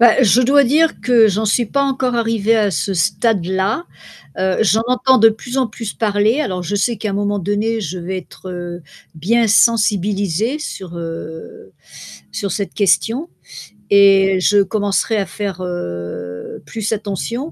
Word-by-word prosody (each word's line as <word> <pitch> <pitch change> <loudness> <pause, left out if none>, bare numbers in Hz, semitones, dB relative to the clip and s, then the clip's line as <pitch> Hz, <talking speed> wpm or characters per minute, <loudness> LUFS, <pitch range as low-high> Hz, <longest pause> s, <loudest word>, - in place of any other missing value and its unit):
Bah, 240 +2 +6
je 245 +1 +4
dois 275 +3 +4
dire 310 +5 +2
que 240 -3 +4
j'en 215 +1 0
suis 225 +3 +1
pas 280 +6 0
encore 265 -2 -1
arrivée 225 -2 +1
à 210 -2 +2
ce 195 0 -2
stade-là. 190 - 0 0.5
Heu, 190 0 0
j'en 220 +1 +3
entends 255 +1 +3
de 225 0 +7
plus 230 +3 -5
en 260 - +2
plus 225 -1 -7
parler. 215 +4 +1
Alors, 185 -10 -3
je 205 +4 -3
sais 230 +4 0
qu'à 215 - -4
un - - -4
moment 205 0 -1
donné, 210 +4 -1
je 185 -2 -5
vais 180 +2 -4
être, 185 +1 -12
heu, 175 -1 -6 0.3
bien 225 +8 +1
sensibilisée 210 - +2
sur, 185 - -7
heu, 165 -1 -8 0.6
sur 200 -3 -4
cette 200 -1 -4
question 225 - +1 0.6
et 195 -1 +5
je 200 +2 +4
commencerai 205 +2 0
à 200 - 0
faire, 190 -1 -5
heu, 90 - -6
plus 220 +5 -4
attention. 220 - -4
205 Hz, 160 wpm, -18 LUFS, 190-230 Hz, 0.6 s, de